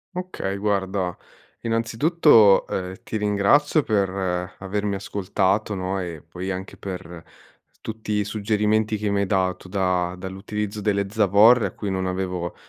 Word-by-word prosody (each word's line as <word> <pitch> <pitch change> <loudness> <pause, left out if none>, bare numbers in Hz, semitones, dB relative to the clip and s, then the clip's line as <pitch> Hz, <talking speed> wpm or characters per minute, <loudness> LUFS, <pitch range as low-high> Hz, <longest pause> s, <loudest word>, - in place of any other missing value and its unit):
Okay, 180 - -4
guarda, 95 -3 -1 0.5
innanzitutto, 115 - +4
ehm, 95 0 -4
ti 110 - -3
ringrazio 105 +9 +3
per 100 -5 +1 0.5
avermi 100 +1 -2
ascoltato, 100 +1 -1
no, 95 +1 -2
e 85 -4 -6
poi 90 +3 -6
anche 95 +1 -5
per 90 -3 -7 0.6
tutti 110 -1 -5
i 105 0 +1
suggerimenti 105 +1 0
che 105 0 -2
mi 100 - +1
hai - - +1
dato 95 -2 0
da 90 -2 0
dall'utilizzo 100 +3 -5
delle 100 -1 0
zavorre 110 +3 +5
a - - -8
cui 105 - -4
non 95 0 -1
avevo 90 -2 -3
100 Hz, 135 wpm, -23 LUFS, 95-105 Hz, 0.6 s, zavorre